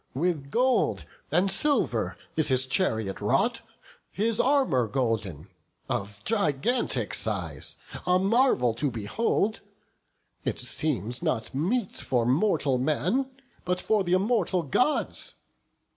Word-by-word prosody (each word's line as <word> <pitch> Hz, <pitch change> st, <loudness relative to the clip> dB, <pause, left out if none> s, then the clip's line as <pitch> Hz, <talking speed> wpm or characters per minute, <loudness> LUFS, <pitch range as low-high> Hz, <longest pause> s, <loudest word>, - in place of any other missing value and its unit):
With 150 Hz, -2 st, -1 dB
gold 255 Hz, -, +1 dB, 0.3 s
and 190 Hz, +2 st, +2 dB
silver 290 Hz, +8 st, 0 dB, 0.2 s
is 155 Hz, -, +1 dB
his 130 Hz, -2 st, +2 dB
chariot 110 Hz, -, 0 dB
wrought, 215 Hz, -, +1 dB, 0.5 s
His 220 Hz, +2 st, 0 dB
armour 260 Hz, -, +3 dB
golden, 110 Hz, -, -2 dB, 0.4 s
of 100 Hz, +1 st, -4 dB
gigantic 205 Hz, -, 0 dB
size, -, -, -4 dB, 0.3 s
A 180 Hz, 0 st, +5 dB
marvel 195 Hz, -, +3 dB
to 140 Hz, +5 st, -1 dB
behold! 195 Hz, -, -1 dB, 0.8 s
it -, -, -2 dB
seems 125 Hz, -5 st, -1 dB
not 110 Hz, -1 st, -1 dB
meet 190 Hz, -, -1 dB
For 120 Hz, -3 st, 0 dB
mortal 140 Hz, -, +2 dB
man, 165 Hz, -, 0 dB, 0.3 s
but 180 Hz, +1 st, -1 dB
for 215 Hz, 0 st, +1 dB
th' 175 Hz, -, -5 dB
immortal 185 Hz, -1 st, +2 dB
Gods. 250 Hz, -, 0 dB
165 Hz, 115 wpm, -27 LUFS, -, 0.8 s, A